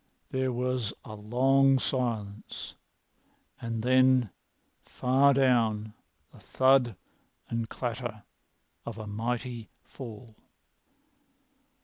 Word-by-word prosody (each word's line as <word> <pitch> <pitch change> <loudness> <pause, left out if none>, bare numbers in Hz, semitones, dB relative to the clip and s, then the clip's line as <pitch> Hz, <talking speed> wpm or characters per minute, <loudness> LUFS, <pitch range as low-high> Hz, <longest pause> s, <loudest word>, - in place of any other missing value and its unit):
There 130 0 0
was 125 -2 -2
a 110 - -8
long 135 +6 +3
silence 115 -6 -3 0.9
and 115 -1 -3
then, 130 -3 +4 0.5
far 135 +3 +3
down, 115 -6 +2 0.4
the - - -15
thud 130 -4 +3 0.6
and 115 -1 -2
clatter 120 -3 -4 0.6
of 115 -2 -7
a 110 - -6
mighty 115 +2 -4
fall. 115 -3 -10
120 Hz, 85 wpm, -29 LUFS, 110-130 Hz, 0.9 s, then